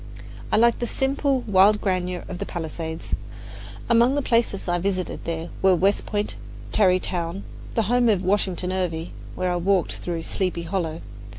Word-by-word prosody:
I -, -, +4 dB
liked 235 Hz, +1 st, +4 dB
the 240 Hz, -, -1 dB
simple, 270 Hz, 0 st, 0 dB
wild 205 Hz, -1 st, +5 dB
grandeur 180 Hz, -2 st, -1 dB
of 180 Hz, -, -6 dB
the -, -, -2 dB
palisades. 160 Hz, -1 st, -5 dB, 0.7 s
Among 235 Hz, +3 st, +4 dB
the 285 Hz, -, 0 dB
places 230 Hz, -6 st, +1 dB
I 175 Hz, 0 st, +1 dB
visited 175 Hz, -3 st, -3 dB
were 190 Hz, -1 st, +5 dB
West 195 Hz, +4 st, +1 dB
Point, 205 Hz, -1 st, -1 dB, 0.4 s
Tarrytown, 185 Hz, -2 st, +1 dB, 0.3 s
the 225 Hz, -, +3 dB
home 240 Hz, +3 st, +3 dB
of 195 Hz, -4 st, +2 dB
Washington 185 Hz, -1 st, 0 dB
Irving, 175 Hz, -3 st, -2 dB, 0.2 s
where 185 Hz, -1 st, 0 dB
I 175 Hz, -, 0 dB
walked 185 Hz, +1 st, +1 dB
through 170 Hz, -2 st, -4 dB
"Sleepy 180 Hz, -2 st, -2 dB
Hollow." 165 Hz, -2 st, -2 dB
185 Hz, 155 wpm, -24 LUFS, 175-210 Hz, 0.7 s, wild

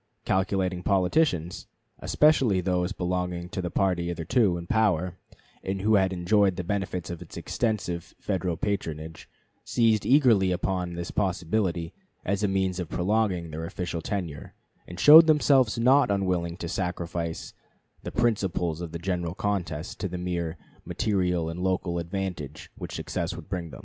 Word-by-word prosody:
Calculating 95 Hz, -1 st, 0 dB
politicians, 90 Hz, -, +1 dB, 0.3 s
especially 135 Hz, -10 st, +3 dB
those 90 Hz, 0 st, 0 dB
belonging 90 Hz, -2 st, -2 dB
to 95 Hz, -, -3 dB
the 90 Hz, -, -3 dB
party 90 Hz, -1 st, 0 dB
hitherto 85 Hz, +3 st, +1 dB
in 85 Hz, -, -7 dB
power, 90 Hz, -4 st, +1 dB, 0.4 s
and 95 Hz, 0 st, -3 dB
who 110 Hz, +1 st, +3 dB
had 95 Hz, -2 st, +4 dB
enjoyed 95 Hz, +2 st, +2 dB
the 90 Hz, -, -4 dB
benefits 90 Hz, -2 st, -3 dB
of 85 Hz, -, -6 dB
its -, -, -10 dB
extensive 95 Hz, -7 st, -2 dB
Federal 90 Hz, -4 st, -2 dB
patronage, 80 Hz, -5 st, -4 dB, 0.3 s
seized 110 Hz, -3 st, +2 dB
eagerly 120 Hz, -9 st, +4 dB
upon 90 Hz, -1 st, -2 dB
this 85 Hz, 0 st, -5 dB
possibility 90 Hz, -2 st, -1 dB, 0.3 s
as 100 Hz, +1 st, 0 dB
a 105 Hz, -, +2 dB
means 95 Hz, -1 st, 0 dB
of 90 Hz, -3 st, -4 dB
prolonging 90 Hz, -3 st, 0 dB
their 80 Hz, +1 st, -5 dB
official 85 Hz, 0 st, -4 dB
tenure, 85 Hz, -7 st, -5 dB, 0.3 s
and 90 Hz, +1 st, -9 dB
showed 160 Hz, -, +10 dB
themselves 140 Hz, -7 st, +4 dB
not 130 Hz, +3 st, +4 dB
unwilling 90 Hz, -4 st, 0 dB
to 85 Hz, -, -5 dB
sacrifice 85 Hz, -2 st, -3 dB, 0.5 s
the -, -, -6 dB
principles 95 Hz, -8 st, 0 dB
of 85 Hz, -2 st, -6 dB
the -, -, -3 dB
general 90 Hz, -1 st, -3 dB
contest 90 Hz, -6 st, -3 dB
to 95 Hz, -, -2 dB
the 90 Hz, 0 st, -5 dB
mere 85 Hz, -2 st, -3 dB, 0.3 s
material 90 Hz, -6 st, 0 dB
and 80 Hz, +2 st, -5 dB
local 90 Hz, -1 st, -1 dB
advantage 85 Hz, -5 st, -5 dB
which -, -, -7 dB
success -, -, -3 dB
would -, -, -10 dB
bring 90 Hz, -4 st, -3 dB
them. -, -, -10 dB
90 Hz, 150 wpm, -27 LUFS, 85-100 Hz, 0.5 s, showed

